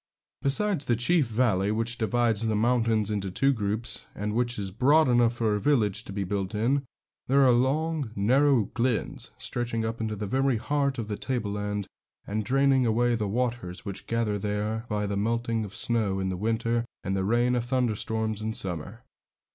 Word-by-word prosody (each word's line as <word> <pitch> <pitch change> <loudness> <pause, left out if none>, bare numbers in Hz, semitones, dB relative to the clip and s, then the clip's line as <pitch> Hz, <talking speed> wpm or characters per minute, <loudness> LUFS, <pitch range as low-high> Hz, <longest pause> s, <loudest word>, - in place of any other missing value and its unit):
Besides 165 +3 +1
the 120 - +2
chief 140 +5 +2
valley, 110 -4 +1
which 115 +2 -1
divides 115 -1 +1
the 110 - +1
mountains 115 -2 +2
into 100 -2 -2
two 135 +9 +2
groups, 110 0 -2
and 105 +1 -3
which 120 +1 0
is 100 -2 -4
broad 145 +9 +4
enough 120 -1 +3
for 115 -3 +1
a 105 - 0
village 110 -6 +2
to - - -8
be 100 0 -2
built 95 0 -3
in, 125 +7 +1 0.5
there 135 +1 +5
are 125 - +6
long, 140 +3 +1
narrow 130 +4 +3
glens, 120 -1 -1
stretching 115 -2 -2
up 115 +1 -3
into 110 -1 -2
the 105 +1 -4
very 130 +3 +1
heart 140 +3 0
of 115 -3 -4
the 105 -1 -3
tableland, 105 -5 -2 0.4
and 105 +1 -2
draining 135 +3 +3
away 120 +1 +2
the 110 -3 -1
waters 115 -4 -3
which 100 -1 -6
gather 115 -3 0
there 105 +2 -2
by 105 -1 -1
the 100 0 -2
melting 115 +1 0
of 100 -2 -10
snow 105 -4 0
in 95 0 -1
the 95 - -2
winter 115 +4 0 0.2
and 95 - -1
the 95 - 0
rain 120 +4 +2
of 120 -1 -1
thunderstorms 110 -3 -1
in 110 +1 -2
summer. 95 +4 -4
115 Hz, 185 wpm, -27 LUFS, 105-125 Hz, 0.5 s, are